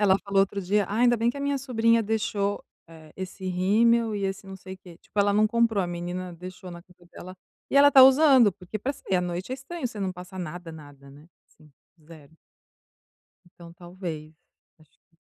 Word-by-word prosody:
ela 195 -2 +4
falou 200 -1 -1
outro 200 +1 0
dia: 200 +2 0
"Ainda 240 +4 +2
bem 230 +2 +1
que - - -11
a - - -6
minha 280 0 -1
sobrinha 230 -3 +2
deixou, 205 -2 -2 0.2
eh, 160 -2 -15
esse 190 0 -8
rímel 220 +5 +2
e 200 - -3
esse 195 0 -4
não 190 - -9
sei 190 0 -10
que, 175 -3 -15
tipo - - -10
ela 200 0 +3
não 215 +1 +4
comprou", 230 -3 +1
a - - -2
menina 175 +1 -5
deixou 180 +1 -10
na 170 0 -10
cama 180 -1 -23
dela, 185 +1 -11 0.3
e - - 0
ela 285 +1 +8
está 270 -2 +8
usando 265 -4 +6
porque 185 +4 -8
para 270 +7 -3
sair 195 -8 -2
à 180 - +1
noite 180 +4 -5
é - - -1
estranho 270 +3 -6
você 220 -3 -8
não 190 -1 -2
passar 180 +1 -11
nada 175 0 -7
nada, 145 -3 -14
né. 145 +3 -16 0.2
Assim, 155 -2 -23 0.3
0. 155 -2 -16 1.1
Então 170 -1 -15
talvez, 170 -3 -8 0.4
acho 155 -2 -26
que 165 - -38
190 Hz, 205 wpm, -25 LUFS, 175-225 Hz, 1.1 s, ela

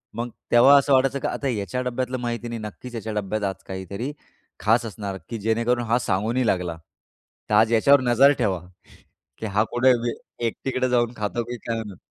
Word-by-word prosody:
मग 120 +2 -3 0.2
तेव्हा 130 +4 +7
असं 140 0 +3
वाटायचं, 135 +1 +3
की - - -2
आता 140 - -3
याच्या 125 +1 -2
डब्यातलं 125 +1 -2
माहिती 120 0 -3
नाही 115 -1 -5
नक्कीच 115 +3 -8
याच्या 110 -1 -4
डब्यात 105 0 -2
आज 95 -1 -3
काहीतरी 100 +7 -5 0.5
खास 115 +5 +2
असणार, 100 -3 -5
की 115 - -4
जेणेकरून 115 +3 +1
हा 115 +2 +2
सांगू 105 -1 0
नाही 130 -1 +1
लागला. 90 -4 0 0.7
तर 105 - -1
आज 110 +2 +4
याच्यावर 140 +5 +5
नजर 130 +3 +5
ठेवा, 95 -7 +1 0.8
की 110 - -6
हा 105 +1 +2
कुठे 130 +2 +4 0.6
एकटीकडे 130 +2 -2
जाऊन 120 -1 +2
खातो, 105 +3 -2
की 120 +1 -6
काय 115 0 -4
म्हणून. 105 -5 -7
115 Hz, 185 wpm, -24 LUFS, 105-125 Hz, 0.8 s, तेव्हा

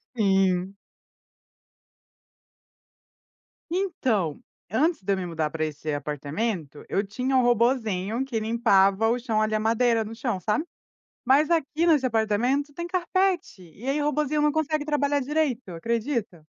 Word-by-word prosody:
Sim. 190 -2 +2 3.0
Então, 255 - 0 0.3
antes 305 - +1
de 200 +1 0
eu - - -1
me 185 - -3
mudar 160 -3 -2
pra 155 0 -2
esse 150 0 -4
apartamento, 150 - -3
eu 200 +1 0
tinha 255 +6 -2
um 255 - +5
robozinho 235 -2 +1
que 235 -4 -2
limpava 220 -2 +3
o 245 +1 +1
chão, 225 -3 0
ali, 215 0 +1
a - - +1
madeira 230 +1 +2
no 225 +1 -8
chão, 230 -5 -2
sabe. 210 - -1 0.6
Mas 285 +5 +4
aqui 325 0 +1
nesse 300 -5 +4
apartamento, 245 +6 0
tem 340 +2 -4
carpete, 365 - 0
e 245 +6 -8
aí 290 +2 +1
o - - 0
robozinho 300 0 0
não 300 -1 +3
consegue 310 -1 0
trabalhar 290 -1 +1
direito, 265 -6 -1
acredita? 225 - -3
230 Hz, 140 wpm, -25 LUFS, 195-290 Hz, 3.0 s, um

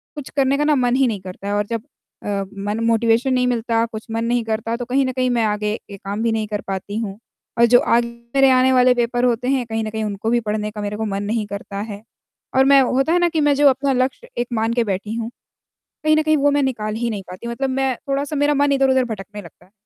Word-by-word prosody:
कुछ 290 -3 -7
करने 275 0 +3
का 295 - +1
ना 300 0 +3
मन 250 -2 +2
ही 265 -1 +3
नहीं 210 -4 -2
करता 195 +2 -6
और 205 0 0
जब 230 -2 -1 0.4
अ, - - -7 0.3
मन 205 +3 -3
मोटिवेशन 230 +3 +2
नहीं 250 0 +2
मिलता, 230 -1 +1
कुछ 220 -1 -8
मन 225 +1 -1
नहीं 240 0 +1
करता 225 +1 -2
तो 245 - -5
कहीं 265 +2 +1
न 255 - -1
कहीं 255 0 0
मैं 235 -2 +1
आगे 210 0 -1 0.2
काम 200 +3 -5
भी 230 - +2
नहीं 220 -1 -1
कर 210 -1 -3
पाती 195 +2 -4
हूँ। 200 -3 -4 0.4
और 235 - +7
जो 245 +1 +6
आगे 235 0 +2 0.3
मेरे 270 -1 +6
आने 255 +1 +4
वाले 250 0 +5
पेपर 245 0 0
होते 245 0 0
हैं 260 -3 +1
कहीं 225 0 -2
न 215 - -3
कहीं 220 0 -3
उनको 210 +1 -3
भी 240 - +3
पढ़ने 210 0 -2
का 210 -1 -7
मेरे 205 0 -3
को 220 - -2
मन 200 0 -3
नहीं 215 +1 -1
करता 200 0 -7
है 205 +1 -9 0.5
और 265 0 +5
मैं 275 0 +7
होता 270 +6 +1
है 355 - +3
ना 350 0 +3
कि 320 -2 0
मैं 290 -1 +4
जो 290 0 +5
अपना 270 +1 +1
लक्ष्य 260 - -1
एक 240 - -1
मान 225 0 0
के 240 - +2
बैठी 205 +1 -3
हूँ, 230 0 -3 0.7
कहीं 310 0 +4
न 310 - +4
कहीं 310 0 +3
वो 285 +1 +3
मैं 285 -1 +2
निकाल 215 -5 -2
ही 235 +1 -1
नहीं 205 -3 -4
पाती, 185 +6 -8
मतलब 265 +3 -2
मैं 265 -1 0
थोड़ा-सा 280 +2 -1
मेरा 290 +1 +2
मन 285 0 +2
इधर-उधर 265 -1 +3
भटकने 210 -2 -7
लगता 170 - -16
है, 190 - -28
235 Hz, 260 wpm, -20 LUFS, 215-265 Hz, 0.7 s, और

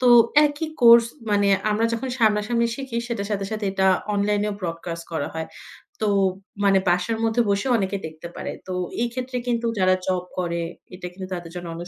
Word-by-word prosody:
তো 255 - +2 0.4
একই 295 +2 -3
কোর্স 235 0 +8 0.3
মানে 205 -1 +3 0.2
আমরা 215 +2 +1
যখন 255 +3 -2
সামনাসামনি 225 +1 +2
শিখি 265 -4 -5
সেটার 205 -3 -3
সাথে, 200 -1 -1
সাথে 215 -1 -3
এটা 190 0 +2 0.3
অনলাইনেও 205 +1 +1
ব্রডকাস্ট 170 -1 -5
করা 155 -3 -2
হয় 160 0 -3 0.6
তো 215 - +2 0.6
মানে 195 -1 +5
বাসার 180 +6 +1
মধ্যে 225 +1 +2
বসেও 200 +6 +1
অনেকে 195 -1 -1
দেখতে 160 +2 -10
পারে। - - -4 0.2
তো - - -5 0.3
এই 240 - +2
ক্ষেত্রে 255 0 -3
কিন্তু 235 -1 0
যারা 185 0 +4
জব 185 -1 0
করে 170 -1 -1 0.3
এটা 180 - -7
কিন্তু 185 0 -7
তাদের 175 -2 -6
জন্য 175 -1 -6
অনেক 175 +1 -7
200 Hz, 180 wpm, -23 LUFS, 180-230 Hz, 0.6 s, কোর্স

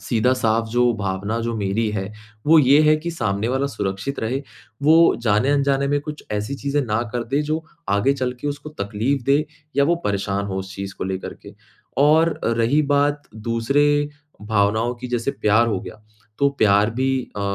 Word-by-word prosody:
सीधा 120 +1 +1
साफ 115 -1 +1
जो 120 +1 +2
भावना 100 +3 -2
जो 115 0 -2
मेरी 105 +2 0
है, 100 0 -4 0.3
वो 160 +1 +7
ये 140 +1 +6
है 155 0 +5
कि 170 +3 -4
सामने 110 -8 -2
वाला 135 +2 0
सुरक्षित 105 +2 -4
रहे, 130 +5 -2 0.4
वो 160 +3 +6
जाने-अनजाने 140 +5 +2
में 145 0 +1
कुछ 150 +1 -8
ऐसी 105 +6 -2
चीज़ें 140 +1 -1
ना 110 +1 0
कर 120 -1 -2
दे 140 +5 0
जो 155 +2 -2 0.3
आगे 100 +7 +2
चल 130 -2 -2
के 145 - -2
उसको 145 +1 -5
तकलीफ़ 115 +7 -1
दे 140 +2 +3 0.3
या 140 - +4
वो 170 - +3
परेशान 100 0 -1
हो 95 -1 -4
उस 95 +1 -7
चीज़ 100 0 -6
को - - -3
लेकर 95 0 -4
के, - - -14 0.4
और 155 +3 +4
रही 115 +6 +2
बात 145 0 +1
दूसरे 115 +6 +1 0.6
भावनाओं 110 +3 +1
की 125 +1 -8
जैसे 120 +2 -1
प्यार 110 0 +2
हो 100 -5 -1
गया, 110 0 -11 0.4
तो 140 - +4
प्यार 105 +1 +4
भी 130 +1 +2 0.3
अ, - - -3
120 Hz, 185 wpm, -21 LUFS, 105-140 Hz, 0.6 s, वो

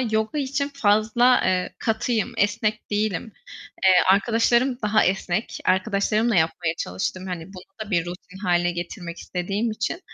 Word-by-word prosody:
yoga 220 +3 -1
için 280 0 -1
fazla, 220 +1 +3
eee, 185 -1 0
katıyım, 230 +1 -1
esnek 215 +1 0
değilim. 210 0 -1 0.5
Eee, 190 - +7 0.2
arkadaşlarım 235 +5 +3
daha 215 +1 +3
esnek. 190 +2 -1
Arkadaşlarımla 210 +3 +1
yapmaya 165 0 +1
çalıştım 140 - -3
hani 175 -3 -5
bunu 190 -1 -12 0.2
da - - -12
bir 175 -3 +1
rutin 180 +2 -9
hâle 175 -3 +1
getirmek 175 0 -6
istediğim 195 +6 -2
için. 215 - -3
205 Hz, 135 wpm, -23 LUFS, 180-225 Hz, 0.5 s, Eee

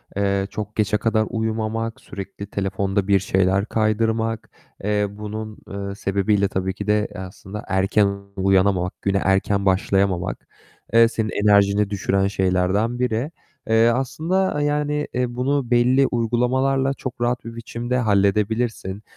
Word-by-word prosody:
eee, 100 -1 0
çok 105 0 -6
geçe 105 -1 +1
kadar 110 -1 +1
uyumamak, 110 0 -2
sürekli 100 +1 -8
telefonda 95 0 -1
bir 100 -1 +4
şeyler 95 +2 +1
kaydırmak. 110 0 0 0.3
Eee, 105 0 +1
bunun, 105 +1 -7
eee, 100 0 -5
sebebiyle 100 0 +1
tabii 95 0 -2
ki 105 - -7
de, 105 0 +2
eee, 100 - -10
aslında 95 +2 -8
erken 100 +1 +2 0.2
uyanamamak, 95 -1 +1
güne 100 0 +1
erken 100 +1 +1
başlayamamak, 95 -1 0 0.5
eee, 115 0 +7
senin 110 -1 -2
enerjini 100 0 +3
düşüren 95 -1 +1
şeylerden 95 +5 0
biri. 125 +4 -1 0.4
Eee, 115 +1 +5
aslında, 155 +6 0
eee, - - +1
yani, 150 0 0
eee, 125 -1 -1
bunu 130 0 0
belli 125 +3 +4
uygulamalarla 130 +3 +1
çok 130 -3 -7
rahat 120 0 0
bir 115 0 -7
biçimde 120 +2 -3
halledebilirsin. 105 -1 0
105 Hz, 135 wpm, -22 LUFS, 100-120 Hz, 0.5 s, eee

